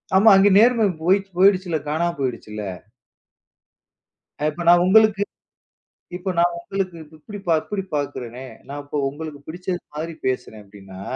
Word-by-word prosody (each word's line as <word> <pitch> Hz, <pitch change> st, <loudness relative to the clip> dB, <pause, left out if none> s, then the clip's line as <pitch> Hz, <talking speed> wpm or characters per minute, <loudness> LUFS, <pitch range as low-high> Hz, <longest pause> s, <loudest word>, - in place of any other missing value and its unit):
ஆமா. 210 Hz, +4 st, +7 dB
அங்கே 200 Hz, +1 st, +5 dB
நேர்மை 235 Hz, -1 st, +4 dB, 0.2 s
போயிச்சு 195 Hz, +2 st, +2 dB
போயிடுச்சு. 190 Hz, -1 st, +4 dB, 0.2 s
காணா 160 Hz, +3 st, 0 dB
போயிடுச்சுல்ல. 115 Hz, -5 st, -4 dB, 1.8 s
அப்ப 155 Hz, +3 st, -2 dB
நான் 175 Hz, 0 st, +6 dB
உங்களுக்கு 215 Hz, +1 st, +5 dB, 0.9 s
இப்ப 190 Hz, +2 st, -5 dB
நான் 175 Hz, 0 st, +2 dB
உங்களுக்கு 185 Hz, 0 st, -4 dB, 0.2 s
இப்படி 205 Hz, +7 st, -10 dB
பா 165 Hz, -, +4 dB
இப்படி 200 Hz, -2 st, -4 dB
பார்க்குறனே. 130 Hz, -3 st, -4 dB, 0.2 s
நான் 145 Hz, +1 st, -6 dB
இப்ப 145 Hz, -, -4 dB
உங்களுக்குப் 145 Hz, -1 st, -9 dB
பிடிச்ச 180 Hz, +3 st, -4 dB, 0.2 s
மாரி 160 Hz, +2 st, -5 dB
பேசுறேன். 120 Hz, -4 st, -3 dB
அப்படின்னா 95 Hz, -1 st, -12 dB
170 Hz, 130 wpm, -22 LUFS, 145-195 Hz, 1.8 s, ஆமா